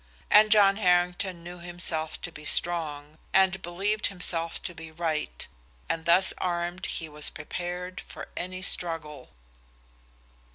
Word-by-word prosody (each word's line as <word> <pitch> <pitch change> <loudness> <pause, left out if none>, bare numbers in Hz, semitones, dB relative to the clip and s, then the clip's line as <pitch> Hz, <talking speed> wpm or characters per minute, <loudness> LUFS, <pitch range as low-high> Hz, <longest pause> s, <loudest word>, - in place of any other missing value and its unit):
And 215 +1 +7
John 200 -2 +6
Harrington 180 -2 +1
knew 175 +1 -9
himself 170 -2 -3
to 175 - -5
be 150 -2 -11
strong, 155 -3 0 0.2
and 190 0 +4
believed 195 +5 -1
himself 170 -3 -1
to 175 - -4
be 160 -1 -10
right, 155 - -3 0.4
and 160 -1 -2
thus 175 +3 +6
armed 175 +1 -2
he 160 - -3
was 150 -1 -2
prepared 180 +3 -5
for - - -9
any 185 +1 -5
struggle. 160 -7 0
175 Hz, 130 wpm, -27 LUFS, 160-185 Hz, 0.4 s, And